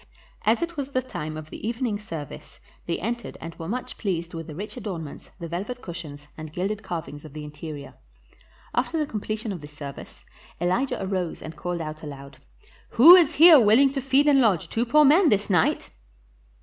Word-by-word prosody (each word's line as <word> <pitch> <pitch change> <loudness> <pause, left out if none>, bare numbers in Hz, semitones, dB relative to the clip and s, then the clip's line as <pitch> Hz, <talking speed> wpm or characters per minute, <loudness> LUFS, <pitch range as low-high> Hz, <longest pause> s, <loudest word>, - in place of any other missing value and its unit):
As 230 +9 +3
it 340 -1 -5
was 280 -1 -3
the 255 -2 0
time 155 -10 -6
of 155 0 -9
the - - -6
evening 230 -3 -2
service 165 -9 -9 0.3
they 170 - -1
entered 235 +4 -4
and 165 0 -7
were 165 - -5
much 245 +6 -4
pleased 175 -4 -2
with 165 -1 -6
the 155 - -8
rich 205 +6 -6
adornments, 185 - -7
the 170 - -5
velvet 200 +9 -5
cushions, 150 -4 -8
and 155 -1 -8
gilded 195 +6 -2
carvings 160 -6 -6
of 155 -3 -12
the 155 0 -7
interior. 150 -1 -8 0.8
After 255 +7 0
the 305 - +1
completion 215 -2 -4
of 180 -5 -6
the 150 - -9
service, 145 -2 -10 0.4
Elijah 185 +11 0
arose 185 -3 -3
and 160 - -8
called 175 -1 -4
out 155 0 -6
aloud, 140 -2 -10 0.6
"Who 320 +10 +11
is 335 -4 +4
here 325 -1 +9
willing 240 +5 +5
to 275 -1 -3
feed 270 +3 +3
and 280 -2 +5
lodge 205 -8 +2
two 235 +2 -1
poor 300 +5 +5
men 315 +5 +6
this 205 -2 +1
night?" 175 -4 +1
195 Hz, 190 wpm, -25 LUFS, 160-250 Hz, 0.8 s, Who